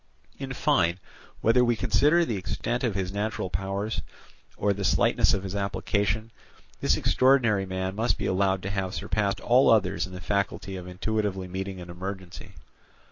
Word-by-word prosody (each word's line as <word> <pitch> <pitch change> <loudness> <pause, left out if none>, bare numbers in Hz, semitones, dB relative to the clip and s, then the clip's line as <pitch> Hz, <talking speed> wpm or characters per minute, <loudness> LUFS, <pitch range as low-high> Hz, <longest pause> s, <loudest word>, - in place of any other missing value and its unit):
In 135 -1 -5
fine, 95 - +2 0.4
whether 120 +3 +4
we 120 -1 +2
consider 160 +8 +3
the 115 - -2
extent 120 +6 -3
of 115 -6 0
his 95 -1 -2
natural 100 -2 -3
powers, 100 +3 -2 0.6
or 100 - +2
the 100 0 -5
slightness - - +3
of 95 - -4
his 95 0 -5
application, 100 +3 -1 0.5
this - - +2
extraordinary 120 -7 +3
man 95 0 -3
must 115 +4 0
be - - -3
allowed 95 0 +1
to 100 - -3
have 95 -1 -2
surpassed 100 -2 -1
all 125 +3 +4
others 100 -4 +2
in 95 - -12
the 90 - -7
faculty 95 +1 -2
of 90 -1 -7
intuitively 95 0 -2
meeting 95 +1 -5
an 90 0 -8
emergency. 95 0 -7
100 Hz, 165 wpm, -27 LUFS, 95-110 Hz, 0.6 s, whether